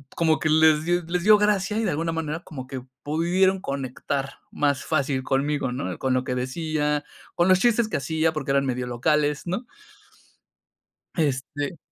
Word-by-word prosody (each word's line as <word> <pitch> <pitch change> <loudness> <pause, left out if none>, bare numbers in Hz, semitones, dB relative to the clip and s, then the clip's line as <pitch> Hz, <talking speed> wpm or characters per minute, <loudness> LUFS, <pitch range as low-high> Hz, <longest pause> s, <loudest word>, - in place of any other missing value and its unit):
como 160 -2 +2
que 155 - 0
les 155 0 +5
di 175 0 +2
les 175 0 -1
dio 210 0 +7
gracia, 210 0 +1
y 225 - 0
de 190 - +1
alguna 165 +3 -1
manera, 165 0 -3
como 130 -4 -8
que 130 -1 -6 0.2
pudieron 180 +5 +2
conectar 135 0 -4
más 140 -2 0
fácil 140 -4 0
conmigo, 140 -1 0
¿no? 130 +3 -4
Con 130 -1 0
lo 130 0 +1
que 125 - -2
decía, 150 +3 -1 0.3
con 175 +1 +3
los 185 0 +6
chistes 235 0 +3
que - - -1
hacía, 160 +2 0
porque 140 -3 -2
eran 140 0 +2
medio 125 -1 -2
locales, 150 +5 0
¿no? 235 +8 -3 1.5
Este 145 +1 -1
150 Hz, 170 wpm, -24 LUFS, 135-170 Hz, 1.5 s, dio